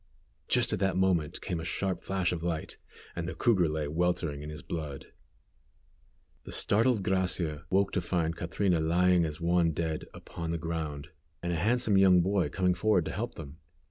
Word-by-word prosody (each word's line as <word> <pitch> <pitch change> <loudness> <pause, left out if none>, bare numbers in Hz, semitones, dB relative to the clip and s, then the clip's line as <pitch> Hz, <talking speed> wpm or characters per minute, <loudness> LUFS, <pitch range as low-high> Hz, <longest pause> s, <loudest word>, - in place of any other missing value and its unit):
Just 120 -2 +3
at 105 - -1
that 95 -1 +1
moment 90 -6 +1
came 85 - -3
a - - -5
sharp 95 +2 -2
flash 95 -2 -1
of 85 -2 -3
light, 85 -2 -3 0.4
and 85 -1 -3
the - - -6
cougar 95 -10 +3
lay 75 -1 -2
weltering 80 -2 -1
in 75 - -7
his 75 -2 -7
blood. 75 -5 -6 1.3
The - - -9
startled 110 0 +2
Gracia 90 -5 -1
woke 100 +1 +2
to 95 - 0
find 85 -2 -1
Catrina 90 +1 0
lying 85 +2 +3
as 75 -1 -5
one 85 -1 +2
dead 80 0 -2
upon 85 -1 -7
the 85 - -1
ground, 80 -3 -4 0.3
and 85 0 -1
a - - 0
handsome 105 +3 +2
young 95 -2 +6
boy 95 +1 +1
coming 90 -1 +1
forward 105 +5 +2
to - - -3
help 120 +3 -4
them. 75 -1 -10
85 Hz, 180 wpm, -29 LUFS, 80-95 Hz, 1.3 s, young